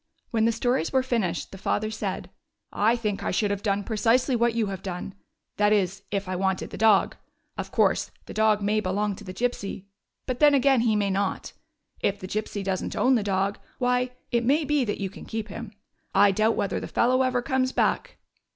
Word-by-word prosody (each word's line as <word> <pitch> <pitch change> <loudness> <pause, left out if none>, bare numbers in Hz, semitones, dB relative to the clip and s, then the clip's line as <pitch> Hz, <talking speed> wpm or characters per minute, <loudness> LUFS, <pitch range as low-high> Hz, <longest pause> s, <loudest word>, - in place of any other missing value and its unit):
When 225 -1 +2
the 230 - +4
stories 230 -5 0
were 260 -1 +2
finished, 220 -10 -1
the 195 - -10
father 215 +3 -1
said: 215 - -4 0.4
"I 220 +3 +3
think 210 -4 -2
I - - -1
should 205 +2 +1
have 200 -1 -2
done 200 -1 0
precisely 235 +5 +2
what 235 0 +2
you 230 -2 +1
have 195 -2 -5
done 185 0 -5 0.2
— - - -55
that 210 0 +3
is, 195 -2 +1
if 200 -1 -2
I 185 - -2
wanted 190 0 -1
the - - -6
dog. 220 -2 +4 0.4
Of - - -5
course, - - +2 0.2
the - - -9
dog 215 -1 +2
may 210 +1 +2
belong 205 +1 -1
to - - -11
the 185 - -7
Gypsy, 200 -2 -3 0.4
but 255 -1 -3
then, 295 -1 +6
again, 270 -2 +4
he 225 -2 +2
may 200 -1 +1
not. 195 0 -2 0.5
If 200 0 0
the 185 - -7
Gypsy 210 0 -3
does 190 -1 -1
n't - - -5
own 260 - +3
the 240 - +3
dog, 200 0 0 0.2
why, 250 0 +1 0.2
it 235 -1 +2
may 290 +6 +2
be 295 -1 +2
that 205 - -3
you 195 -2 -3
can - - -11
keep 220 -1 -4
him. 230 +1 -7 0.4
I 200 +1 +6
doubt 215 +3 +2
whether 195 - -1
the - - -6
fellow 255 +2 +2
ever 255 -1 +1
comes 260 -1 +1
back." - - 0
215 Hz, 215 wpm, -26 LUFS, 195-245 Hz, 0.5 s, then